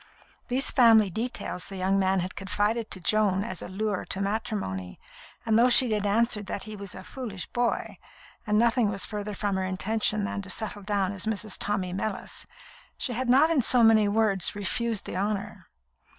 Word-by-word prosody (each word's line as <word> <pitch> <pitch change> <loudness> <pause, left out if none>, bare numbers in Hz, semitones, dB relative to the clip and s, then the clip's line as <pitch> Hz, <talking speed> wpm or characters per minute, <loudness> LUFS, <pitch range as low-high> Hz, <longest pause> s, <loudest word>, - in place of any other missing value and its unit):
These 260 +2 0
family 225 -6 +5
details 225 -3 -4
the 195 - -8
young 190 +1 +1
man 190 -1 +1
had 185 +1 -5
confided 210 +3 -1
to 185 - -3
Joan 200 0 +2
as 185 -5 -5
a - - -6
lure 200 +1 -2
to 190 - -5
matrimony, 195 - -3 0.5
and 225 0 +3
though 245 +2 +5
she 245 -1 +5
had 210 -1 0
answered 210 -1 +2
that 200 - -4
he 215 0 -8
was 200 -2 -7
a 185 - -9
"foolish 215 -3 -6
boy," 240 -1 -2 0.5
and 210 0 +2
nothing 235 -1 +3
was 195 -3 +1
farther 210 -1 -5
from 200 -2 -1
her 190 - -1
intention 210 +3 0
than 200 0 -3
to 190 - -9
settle 210 +1 0
down 200 -1 -1
as 200 +1 -3
Mrs. 215 -2 -1
Tommy 190 -3 -2
Mellis, 195 +1 -4 0.5
she 250 - -2
had 250 +2 -2
not 285 +6 +5
in 305 -5 +3
so 245 +1 +5
many 220 -2 +5
words 205 -4 +2
refused 215 +2 -1
the - - -6
honour. 205 -1 -3
210 Hz, 190 wpm, -27 LUFS, 195-225 Hz, 0.5 s, family